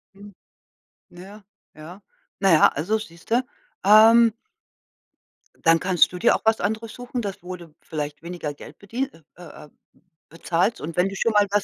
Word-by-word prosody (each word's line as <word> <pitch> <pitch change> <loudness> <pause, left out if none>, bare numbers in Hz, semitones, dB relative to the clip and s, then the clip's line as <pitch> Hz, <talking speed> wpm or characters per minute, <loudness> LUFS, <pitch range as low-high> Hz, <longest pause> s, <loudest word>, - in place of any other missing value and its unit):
Mhm. 200 0 -14 0.8
Naja, 195 +4 -13 0.3
ja, 170 +6 -12 0.4
naja, 185 -6 +5
also 190 +10 -2
siehst 175 -1 -12
du? 245 +2 +3 0.4
Ähm 220 +2 +6 1.3
Dann 165 0 +5
kannst 180 -3 +3
du 180 - -6
dir 235 - +4
auch - - -4
was 220 0 +2
anderes 220 +1 -3
suchen, 245 0 -6
das 195 -4 -6
wo 180 0 -6
du 165 -3 -15
vielleicht 150 -1 -6
weniger 170 -4 -6
Geld - - -13
bedie 235 +7 -4 0.3
äh, 175 - -14 0.2
äh, - - -20 0.6
bezahlst 170 +6 -1
und 160 +1 -6
wenn 180 +2 +3
du 195 - -8
schon 230 - 0
mal 205 -1 +4
was 205 -1 +1
195 Hz, 165 wpm, -23 LUFS, 170-220 Hz, 1.3 s, Ähm